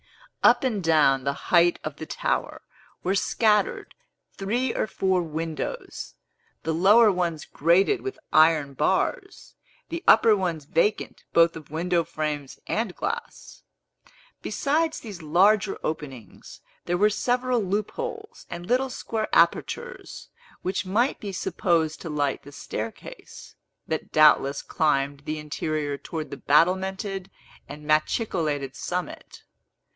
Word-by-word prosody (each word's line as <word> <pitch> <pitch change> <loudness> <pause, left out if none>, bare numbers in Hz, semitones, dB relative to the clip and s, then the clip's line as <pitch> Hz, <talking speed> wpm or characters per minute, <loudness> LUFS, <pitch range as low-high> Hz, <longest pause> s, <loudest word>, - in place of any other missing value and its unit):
Up - - +5
and 220 -7 -1
down 150 -5 +3
the 140 +1 0 0.2
height 175 0 +5
of 150 -1 -5
the 160 - -7
tower - - -2 0.4
were 185 - +1
scattered 210 +1 +1 0.4
three 235 +6 -1
or - - -1
four 190 -2 0
windows, 165 - -5 0.5
the 160 - -1
lower 205 +6 +6
ones 170 -5 -2
grated 185 - +2
with 395 -3 -5 0.2
iron 155 -3 +4
bars, 150 +7 -1 0.4
the 335 +2 -5
upper 220 0 +7
ones 170 -6 -2
vacant 170 +8 0
both 170 0 +5
of 155 -3 -10
window 170 +2 0
frames 150 -4 -4
and 220 -5 -2
glass. 470 +2 -5 0.8
Besides 315 +3 0
these 205 -7 -9
larger 195 +6 +3
openings, 140 -7 -7 0.2
there 175 0 0
were 210 +3 +4
several 245 +2 0
loopholes 435 - -4
and 175 - -7
little 255 +5 +1
square 225 -3 -3
apertures, 480 +1 0 0.3
which 185 +2 -1
might 235 +8 +1
be 205 - -5
supposed 165 -4 0
to 165 - -6
light 145 -2 -1
the 145 - -13
staircase, 110 -5 -8 0.3
that - - -3
doubtless 145 -2 +4
climbed 140 -2 0
the 155 0 -3
interior 150 -1 -3
towards 155 +2 -6
the 140 - -6
battlemented 190 +5 +1 0.4
and 150 +1 -9
machicolated 155 - 0
summit. 180 - -5
175 Hz, 125 wpm, -25 LUFS, 155-215 Hz, 0.8 s, upper